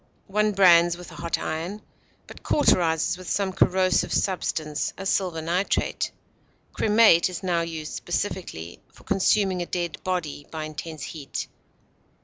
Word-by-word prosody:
One 210 Hz, +1 st, +1 dB
brands 175 Hz, -3 st, +6 dB
with 180 Hz, -, -11 dB
a -, -, -11 dB
hot 170 Hz, -1 st, -2 dB
iron, 170 Hz, +7 st, -4 dB, 0.4 s
but -, -, -13 dB
cauterizes 170 Hz, -, +2 dB
with 185 Hz, -, -8 dB
some 195 Hz, -2 st, 0 dB
corrosive 185 Hz, -1 st, +2 dB
substance, 155 Hz, -5 st, -1 dB
as 195 Hz, +1 st, -2 dB
silver 175 Hz, -5 st, 0 dB
nitrate. 180 Hz, +4 st, 0 dB, 0.6 s
Cremate 210 Hz, -6 st, +5 dB
is 180 Hz, 0 st, -7 dB
now 175 Hz, -2 st, +1 dB
used 160 Hz, -2 st, -5 dB
specifically 80 Hz, +2 st, -4 dB
for -, -, -19 dB
consuming 195 Hz, -1 st, +2 dB
a 175 Hz, -, -4 dB
dead 175 Hz, -2 st, -3 dB
body 170 Hz, -6 st, -3 dB
by 160 Hz, -1 st, -5 dB
intense 155 Hz, 0 st, -7 dB
heat. 145 Hz, -4 st, -5 dB
175 Hz, 135 wpm, -25 LUFS, 160-190 Hz, 0.6 s, brands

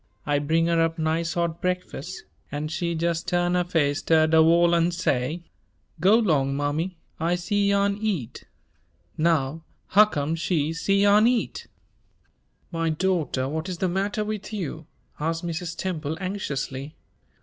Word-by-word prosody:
I 145 Hz, -1 st, +1 dB
bring 160 Hz, +3 st, +1 dB
her 170 Hz, -1 st, +2 dB
up 165 Hz, 0 st, 0 dB
nice 160 Hz, +1 st, -1 dB
hot 170 Hz, -1 st, -1 dB
breakfus', 180 Hz, -1 st, -3 dB, 0.3 s
an' 150 Hz, +1 st, -3 dB
she 170 Hz, +1 st, -2 dB
jes' 170 Hz, 0 st, 0 dB
tu'n 175 Hz, 0 st, 0 dB
her 180 Hz, 0 st, +2 dB
face 155 Hz, -5 st, 0 dB
ter 160 Hz, -1 st, +4 dB
de 160 Hz, 0 st, +5 dB
wall 170 Hz, +2 st, +5 dB
an' 170 Hz, 0 st, +3 dB
say, 170 Hz, -2 st, -1 dB, 0.6 s
'Go 195 Hz, +7 st, +5 dB
'long, 140 Hz, -11 st, +1 dB
mammy, 155 Hz, +5 st, -2 dB, 0.2 s
I 170 Hz, +2 st, +1 dB
c'yarn 200 Hz, +2 st, +1 dB
eat.' 175 Hz, -, -3 dB, 0.7 s
Now, 160 Hz, -1 st, +1 dB, 0.3 s
huccome 175 Hz, -8 st, +4 dB
she 160 Hz, -3 st, 0 dB
c'yarn 200 Hz, +5 st, +4 dB
eat?" 245 Hz, -1 st, -1 dB, 1.0 s
"My 165 Hz, -1 st, -1 dB
daughter, 155 Hz, -6 st, 0 dB
what 160 Hz, +5 st, -3 dB
is 180 Hz, -, -4 dB
the 185 Hz, -, 0 dB
matter 195 Hz, +3 st, -1 dB
with 210 Hz, -1 st, -5 dB
you?" 165 Hz, -6 st, -5 dB, 0.3 s
asked 165 Hz, +3 st, -2 dB
Mrs. 170 Hz, 0 st, -4 dB
Temple, 160 Hz, -4 st, -3 dB
anxiously. 150 Hz, -7 st, -4 dB
170 Hz, 140 wpm, -25 LUFS, 155-185 Hz, 1.0 s, de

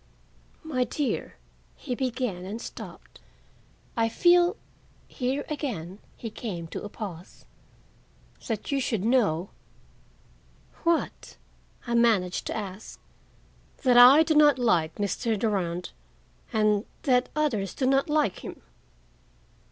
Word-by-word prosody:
"My 275 Hz, -6 st, 0 dB
dear," 265 Hz, -2 st, -3 dB, 0.4 s
he 250 Hz, -, -5 dB
began, 245 Hz, -7 st, -2 dB
and 205 Hz, +5 st, -5 dB
stopped. -, -, -10 dB, 0.8 s
"I 225 Hz, -1 st, +2 dB
feel—" 350 Hz, -, +4 dB, 0.5 s
here 265 Hz, +2 st, -2 dB
he 305 Hz, -, -3 dB
again 205 Hz, -, -5 dB, 0.3 s
came 180 Hz, -8 st, -5 dB
to -, -, -6 dB
a 205 Hz, -, -6 dB
pause—"that 205 Hz, -, -10 dB
you 275 Hz, -1 st, +1 dB
should 220 Hz, -6 st, -1 dB
know—" 205 Hz, -8 st, +2 dB, 1.3 s
"What?" 335 Hz, -1 st, -1 dB, 0.5 s
I 240 Hz, -, -3 dB
managed 220 Hz, -7 st, +2 dB
to -, -, -3 dB
ask. 205 Hz, 0 st, -7 dB, 0.8 s
"That 250 Hz, -2 st, +4 dB
I 255 Hz, +6 st, +9 dB
do 320 Hz, -, +1 dB
not 295 Hz, -2 st, +6 dB
like 175 Hz, -10 st, +1 dB
Mr. 215 Hz, +2 st, -1 dB
Durand 180 Hz, -5 st, -1 dB, 0.6 s
and—that 220 Hz, +4 st, +1 dB
others 230 Hz, -, -1 dB
do 265 Hz, -, -1 dB
not 270 Hz, +3 st, +2 dB
like 300 Hz, -10 st, +1 dB
him." -, -, -9 dB
235 Hz, 110 wpm, -27 LUFS, 200-270 Hz, 1.3 s, I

